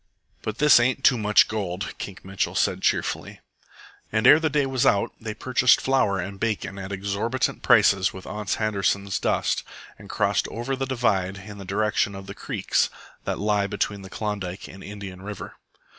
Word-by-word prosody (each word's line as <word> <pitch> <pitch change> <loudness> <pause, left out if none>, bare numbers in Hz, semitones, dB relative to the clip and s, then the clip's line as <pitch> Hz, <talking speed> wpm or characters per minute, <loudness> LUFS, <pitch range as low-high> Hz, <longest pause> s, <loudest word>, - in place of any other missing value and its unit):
"But 110 0 -4
this 150 -2 +7
ain't 130 +2 +1
Too 125 - +6
Much 105 0 +5
Gold," 100 -3 -4
Kink 95 -2 -7
Mitchell 95 0 -2
said - - +1
cheerfully. - - -1 0.7
And 110 +2 +1
ere 150 +4 +9
the 160 -1 +1
day 145 -1 +1
was 130 -2 0
out 100 - +3
they 110 -1 -5
purchased 130 0 +3
flour 130 -7 +2
and 95 +2 -5
bacon 105 -3 -2
at 95 +1 -6
exorbitant 100 +6 -1
prices 100 -5 +4
with 95 0 -10
Ans 105 -2 -3
Handerson's 100 -2 0
dust - - 0 0.4
and - - -13
crossed - - +1
over 120 +4 -3
the 135 0 -3
divide 100 -7 0
in 105 -1 -9
the 100 - -8
direction 105 +1 0
of 95 0 -8
the - - -7
creeks - - 0 0.4
that - - -1
lie 105 -1 +1
between 100 0 -2
Klondike 100 -3 -4
and 95 0 -11
Indian 100 -2 -8
River. 100 0 -7
105 Hz, 175 wpm, -25 LUFS, 95-115 Hz, 0.7 s, ere